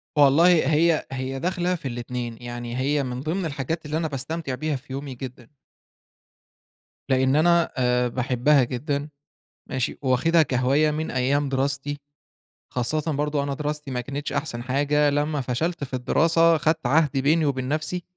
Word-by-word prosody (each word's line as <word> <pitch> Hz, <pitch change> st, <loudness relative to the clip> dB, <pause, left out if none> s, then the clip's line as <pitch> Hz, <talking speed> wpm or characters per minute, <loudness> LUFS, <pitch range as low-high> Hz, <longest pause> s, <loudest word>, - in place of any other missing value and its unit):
والله 145 Hz, +4 st, +6 dB, 0.3 s
هي 165 Hz, +1 st, +3 dB
هي 135 Hz, 0 st, -4 dB
داخلة 180 Hz, +2 st, 0 dB
في 160 Hz, -6 st, -6 dB
الاتنين، 120 Hz, -1 st, -5 dB
يعني 120 Hz, 0 st, -5 dB
هي 140 Hz, +2 st, +1 dB
من 125 Hz, -1 st, -4 dB
ضمن 170 Hz, +5 st, -2 dB
الحاجات 150 Hz, +2 st, -3 dB
اللي 150 Hz, +1 st, -2 dB
أنا 165 Hz, -1 st, -1 dB
باستمتع 140 Hz, 0 st, -4 dB
بيها 155 Hz, +1 st, -2 dB
في 135 Hz, 0 st, -9 dB
يومي 140 Hz, -1 st, -5 dB
جدًا. 125 Hz, 0 st, -9 dB, 1.6 s
لإن 130 Hz, +1 st, +3 dB
أنا 170 Hz, +1 st, +3 dB
آآ 125 Hz, -1 st, +2 dB
باحبها 130 Hz, +3 st, +2 dB
جدًا 140 Hz, +4 st, -3 dB, 0.6 s
ماشي؟ 130 Hz, -2 st, -2 dB
وواخدها 150 Hz, +6 st, +3 dB
كهواية 135 Hz, +3 st, +2 dB
من 155 Hz, +1 st, -3 dB
أيام 140 Hz, +3 st, +1 dB
دراستي. 140 Hz, +1 st, -1 dB, 0.8 s
خاصةً 155 Hz, +6 st, 0 dB
برضه 145 Hz, 0 st, 0 dB
أنا 140 Hz, -, -2 dB
دراستي 150 Hz, 0 st, -4 dB
ما 125 Hz, -1 st, -2 dB
كانتش 140 Hz, +3 st, -5 dB
أحسن 145 Hz, -5 st, -3 dB
حاجة 145 Hz, +3 st, +2 dB
لمّا 145 Hz, 0 st, 0 dB
فشلت 140 Hz, +6 st, -2 dB
في 130 Hz, -, -7 dB
الدراسة، 165 Hz, +6 st, +3 dB
خدت 160 Hz, -2 st, 0 dB
عهد 145 Hz, 0 st, +2 dB
بيني 155 Hz, +4 st, +3 dB
وبين 130 Hz, -2 st, -1 dB
نفسي، 160 Hz, +4 st, -2 dB
140 Hz, 150 wpm, -24 LUFS, 130-155 Hz, 1.6 s, والله